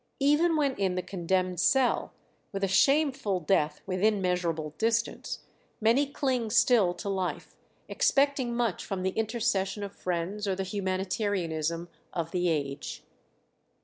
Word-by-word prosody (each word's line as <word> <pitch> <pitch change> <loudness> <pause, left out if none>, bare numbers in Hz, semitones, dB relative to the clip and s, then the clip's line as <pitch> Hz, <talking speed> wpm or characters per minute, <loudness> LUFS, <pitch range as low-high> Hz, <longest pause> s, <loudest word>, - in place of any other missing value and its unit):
Even 300 +4 +3
when 285 -3 +2
in 190 -2 0
the 185 - -2
condemned 185 -1 -1
cell, 265 -2 +2 0.4
with 195 0 -4
a - - +3
shameful 270 -2 +2
death 155 -3 +1
within 195 +3 +1
measurable 170 -4 -1
distance, 230 +1 -1 0.4
many 235 +6 +3
cling 260 -5 -1
still 220 -5 +4
to - - -7
life, 190 -2 -3 0.3
expecting 275 - +2
much 235 -5 0
from 190 -2 -4
the 190 - +1
intercession 220 -2 -1
of 200 0 -6
friends 185 +4 -3
or 190 - +1
the 195 - -2
humanitarianism 185 -4 -2 0.3
of 165 -2 -3
the 180 -1 +1
age. 140 -3 -3
195 Hz, 135 wpm, -28 LUFS, 180-235 Hz, 0.4 s, still